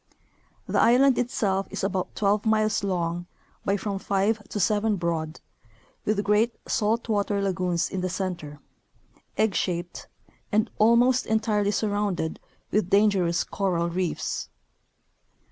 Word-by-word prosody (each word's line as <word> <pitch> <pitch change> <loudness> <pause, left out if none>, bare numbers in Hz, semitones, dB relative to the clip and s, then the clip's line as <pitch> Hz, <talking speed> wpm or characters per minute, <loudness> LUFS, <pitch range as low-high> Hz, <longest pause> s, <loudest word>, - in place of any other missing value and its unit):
The - - +1
island 255 +3 +5
itself 200 -6 0
is - - -5
about 190 -2 -2
twelve 205 0 +1
miles 215 -1 +1
long 175 -2 -2 0.4
by 200 +1 +1
from 200 -1 -3
five 200 +3 0
to 210 - -3
seven 210 +2 +2
broad, 165 -3 -2 0.7
with 210 -1 +1
great 210 +4 +2
salt 225 +2 0
water 205 -2 0
lagoons 180 -3 0
in 190 - -4
the 185 - -1
center 175 -6 -4 0.4
— - - -36
egg 220 -2 +2
shaped 175 -1 -3 0.2
— - - -34
and 215 +1 +1
almost 240 +3 +4
entirely 215 -2 +1
surrounded 205 -5 -1 0.3
with 205 -4 +1
dangerous 195 -5 +3
coral 170 -4 -1
reefs. 180 -1 -2
200 Hz, 130 wpm, -26 LUFS, 180-215 Hz, 0.7 s, island